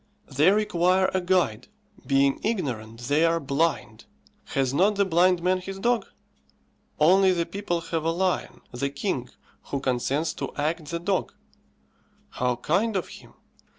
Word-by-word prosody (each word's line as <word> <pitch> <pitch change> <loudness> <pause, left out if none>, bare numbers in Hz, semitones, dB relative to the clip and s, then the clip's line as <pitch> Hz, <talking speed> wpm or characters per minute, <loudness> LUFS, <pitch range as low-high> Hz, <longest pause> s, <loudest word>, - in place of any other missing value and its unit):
They 150 +6 +5
require 190 -2 +2
a 190 - +1
guide; 175 - 0 0.4
being 140 0 +3
ignorant, 120 - -3
they 145 +6 +1
are 165 0 +3
blind. 140 -6 -1 0.4
Has 135 -1 -1
not 200 +8 +3
the 200 0 +2
blind 180 0 +3
man 185 +1 +2
his 195 +1 -7
dog? 235 +3 0 0.9
Only 190 +5 +5
the 170 -1 0
people 185 -4 -3
have 165 -1 -3
a 165 - +1
lion, 180 +2 -1
the 130 +3 -2
king, 140 - -3 0.4
who 140 - -3
consents 135 +4 -1
to - - -6
act 155 +2 -2
the 170 - -2
dog. 185 +2 -2 1.0
How 125 -1 0
kind 200 - 0
of 185 - -2
him! - - -14
170 Hz, 150 wpm, -25 LUFS, 140-185 Hz, 1.0 s, They